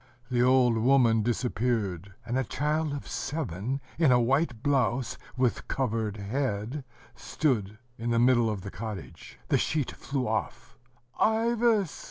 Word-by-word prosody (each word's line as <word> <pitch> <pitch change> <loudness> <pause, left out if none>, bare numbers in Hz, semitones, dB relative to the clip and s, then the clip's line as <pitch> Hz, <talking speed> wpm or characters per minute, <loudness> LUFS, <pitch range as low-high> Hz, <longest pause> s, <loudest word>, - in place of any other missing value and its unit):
The 120 -1 +2
old 125 -2 +4
woman 120 -2 +4
disappeared; 110 -5 -1
and 120 +2 -2
a 130 - +2
child 150 +5 -1
of 140 -1 -5
seven 130 - -3 0.2
in 160 -6 +5
a 125 - +5
white 120 -1 +1
blouse, 135 -3 +1 0.2
with 125 -2 0
covered 110 -5 -1
head, 115 +4 -2 0.3
stood 110 -9 -1 0.2
in 115 +1 -2
the 115 - +2
middle 120 -1 +4
of 105 -3 -3
the 100 +1 -7
cottage.... 110 -3 -8
The - - +3
sheet 150 -4 0
flew 135 -3 -3
off. 110 0 -3 0.4
"Ivas!" 225 -3 +2
125 Hz, 140 wpm, -28 LUFS, 110-140 Hz, 0.4 s, in